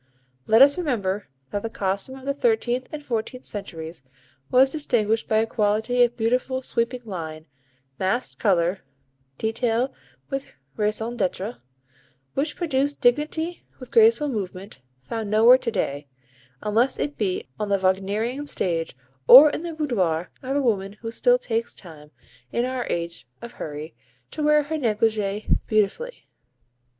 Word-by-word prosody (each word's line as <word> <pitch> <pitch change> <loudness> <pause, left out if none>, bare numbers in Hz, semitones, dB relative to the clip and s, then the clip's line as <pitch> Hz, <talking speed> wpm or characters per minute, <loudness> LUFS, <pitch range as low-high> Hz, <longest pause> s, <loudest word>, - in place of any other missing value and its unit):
Let 225 +4 +8
us 285 +5 +4
remember 210 - -1 0.2
that 205 - -2
the 225 - -4
costume 200 +5 -2
of 265 - -12
the 280 - 0
thirteenth 265 - 0
and 300 -2 -7
fourteenth 245 +1 -3
centuries 165 -6 -7 0.5
was 265 +1 +5
distinguished 225 -7 0
by 220 - +2
a 220 - +3
quality 220 +3 +1
of 240 0 +3
beautiful, 255 +3 0
sweeping 245 +1 -1
line, 160 -6 -6 0.5
massed 195 +7 -1
colour, 185 -2 +2 0.6
detail 230 +3 0 0.4
with 275 0 -4 0.2
raison 220 +3 -1
d'être, 200 +2 -2 0.7
which 290 +2 -1
produced 285 -4 0
dignity 305 +7 0 0.2
with - - -11
graceful 450 -9 +5
movement, 195 - -5 0.2
found 215 - -4
nowhere 230 +4 +7
to 240 - -2
day, 145 -8 -2 0.6
unless 230 +5 +2
it 290 0 -2
be 190 -4 -2
on 210 -1 -2
the 200 - +3
Wagnerian 200 +9 -1
stage 165 - -2 0.3
or 290 +4 +11
in - - -4
the 340 -1 -5
boudoir 185 - -1
of 270 +1 -3
a 285 - +2
woman 200 -5 0
who 225 -1 -4
still - - +3
takes 230 - -3
time, 155 -5 -13 0.4
in 235 - 0
our 255 -1 -3
age 170 -5 -3
of 235 - -9
hurry, 155 -5 -7 0.4
to - - -5
wear 300 0 +4
her 315 +2 -3
negligée 215 -4 0
beautifully. 215 - -1
225 Hz, 145 wpm, -24 LUFS, 195-265 Hz, 0.7 s, or